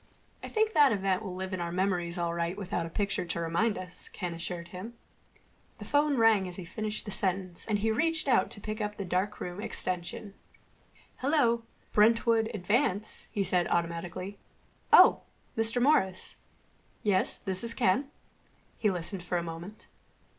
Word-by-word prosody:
"I -, -, -6 dB
think 440 Hz, 0 st, +1 dB
that 290 Hz, -2 st, +6 dB
event 195 Hz, -2 st, 0 dB
will 190 Hz, -4 st, -6 dB
live 190 Hz, +1 st, -5 dB
in 185 Hz, -, -2 dB
our 170 Hz, 0 st, -3 dB
memories 180 Hz, -1 st, 0 dB
all 170 Hz, -1 st, -1 dB
right 170 Hz, +2 st, -2 dB
without 180 Hz, -4 st, -3 dB
a -, -, -9 dB
picture 200 Hz, +3 st, -1 dB
to 170 Hz, -1 st, -3 dB
remind 170 Hz, +7 st, 0 dB
us," 185 Hz, -1 st, -9 dB
Ken 175 Hz, -2 st, -5 dB
assured 170 Hz, 0 st, -5 dB
him. 190 Hz, +7 st, -8 dB, 0.8 s
The -, -, -9 dB
phone 290 Hz, -1 st, +2 dB
rang 220 Hz, -4 st, +4 dB
as 180 Hz, -, -6 dB
he 185 Hz, -, -7 dB
finished 215 Hz, +5 st, -4 dB
the 205 Hz, -, -5 dB
sentence 185 Hz, -2 st, 0 dB
and 215 Hz, -2 st, +1 dB
he 220 Hz, +2 st, 0 dB
reached 320 Hz, +5 st, +1 dB
out 255 Hz, -, +3 dB
to -, -, -6 dB
pick 215 Hz, +2 st, -5 dB
up 210 Hz, 0 st, -3 dB
the 200 Hz, -, -4 dB
darkroom 185 Hz, 0 st, -2 dB
extension. 200 Hz, +1 st, -2 dB, 0.8 s
"Hello. 255 Hz, -5 st, +2 dB, 0.3 s
Brentwood 225 Hz, +1 st, +4 dB
Advance," 210 Hz, +1 st, -1 dB
he 200 Hz, -, -1 dB
said 180 Hz, -2 st, +2 dB
automatically.... 170 Hz, +3 st, -3 dB, 0.5 s
"Oh, -, -, +8 dB, 0.3 s
Mr. 225 Hz, +2 st, +3 dB
Morris.... 215 Hz, -9 st, +2 dB, 0.7 s
Yes, 195 Hz, -3 st, +2 dB
this 190 Hz, 0 st, -1 dB
is 230 Hz, 0 st, +2 dB
Ken." 255 Hz, +4 st, +2 dB, 0.7 s
He 215 Hz, -, +3 dB
listened 180 Hz, +1 st, -2 dB
for 175 Hz, 0 st, -2 dB
a 170 Hz, -, -1 dB
moment. 170 Hz, +5 st, -8 dB
195 Hz, 165 wpm, -29 LUFS, 180-225 Hz, 0.8 s, Oh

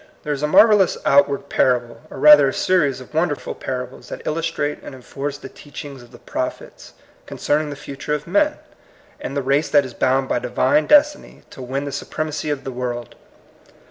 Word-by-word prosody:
There 150 Hz, -, -2 dB
is 140 Hz, -, -5 dB
a 150 Hz, -, +1 dB
marvel 215 Hz, +7 st, +6 dB
lous 190 Hz, -, +2 dB
outward 140 Hz, 0 st, +3 dB
parable, 120 Hz, -2 st, 0 dB
or -, -, -10 dB
rather 145 Hz, 0 st, +7 dB
a 135 Hz, -, -1 dB
series 150 Hz, -8 st, +1 dB
of 130 Hz, -, -14 dB
wonderful 160 Hz, -1 st, -1 dB
parables, 125 Hz, -1 st, -6 dB
that -, -, -8 dB
illustrate 160 Hz, -2 st, -2 dB
and 135 Hz, -, -10 dB
enforce 140 Hz, +2 st, -6 dB
the -, -, -10 dB
teachings 145 Hz, -1 st, -10 dB
of 120 Hz, -, -16 dB
the 120 Hz, -, -13 dB
prophets 125 Hz, -, -6 dB, 0.3 s
con -, -, -8 dB
cerning 150 Hz, +1 st, 0 dB
the 145 Hz, -, -6 dB
future 140 Hz, +1 st, -5 dB
of 150 Hz, -, -6 dB
men, 295 Hz, -, +1 dB, 0.6 s
and 140 Hz, -, -5 dB
the 140 Hz, -, -1 dB
race 140 Hz, +3 st, +1 dB
that 145 Hz, -2 st, +4 dB
is 130 Hz, -, -9 dB
bound 130 Hz, +2 st, +1 dB
by -, -, 0 dB
Divine 295 Hz, -, +1 dB
destiny 295 Hz, 0 st, +2 dB
to -, -, -11 dB
win 135 Hz, +3 st, -4 dB
the 140 Hz, -, -5 dB
supremacy 155 Hz, +1 st, -4 dB
of 145 Hz, -2 st, -3 dB
the 135 Hz, -, -5 dB
world. 120 Hz, -2 st, -5 dB
140 Hz, 195 wpm, -20 LUFS, 130-155 Hz, 0.6 s, rather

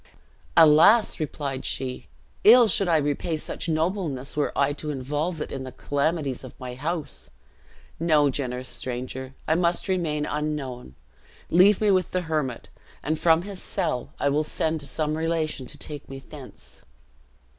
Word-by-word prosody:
"Alas!" 165 Hz, +9 st, +6 dB
replied 140 Hz, -3 st, -3 dB
she, 130 Hz, -1 st, -3 dB, 0.4 s
"ill 235 Hz, +2 st, +8 dB
should 195 Hz, -1 st, +2 dB
I 165 Hz, -2 st, +4 dB
repay 150 Hz, +2 st, -1 dB
such 160 Hz, -, -4 dB
nobleness 160 Hz, -5 st, -1 dB
were 150 Hz, -1 st, 0 dB
I 140 Hz, +1 st, +2 dB
to 150 Hz, +1 st, -5 dB
involve 150 Hz, +5 st, -2 dB
it -, -, -5 dB
in 135 Hz, -, -4 dB
the 130 Hz, -, -7 dB
calamities 145 Hz, -2 st, -1 dB
of 130 Hz, -, -11 dB
my 125 Hz, -1 st, -6 dB
house. 155 Hz, +5 st, -4 dB, 0.7 s
No, 155 Hz, -4 st, +3 dB
generous 130 Hz, -2 st, -3 dB
stranger, 130 Hz, +2 st, -5 dB
I 155 Hz, -, +3 dB
must 170 Hz, +2 st, +1 dB
remain 160 Hz, -6 st, 0 dB
unknown. 145 Hz, -, -4 dB, 0.6 s
Leave 185 Hz, +4 st, +6 dB
me 210 Hz, -1 st, +4 dB
with 185 Hz, -3 st, +2 dB
the 185 Hz, -, +1 dB
hermit; 155 Hz, -8 st, -2 dB, 0.4 s
and 155 Hz, +2 st, -1 dB
from 165 Hz, 0 st, +4 dB
his 195 Hz, -2 st, -7 dB
cell 125 Hz, -, -2 dB
I -, -, +1 dB
will 150 Hz, +2 st, +1 dB
send 160 Hz, +1 st, -1 dB
to 145 Hz, -, -7 dB
some 155 Hz, +2 st, -2 dB
relation 160 Hz, -4 st, -1 dB
to -, -, -10 dB
take 145 Hz, -3 st, -7 dB
me 135 Hz, -, -7 dB
thence." 125 Hz, -, -12 dB
150 Hz, 155 wpm, -25 LUFS, 135-165 Hz, 0.7 s, ill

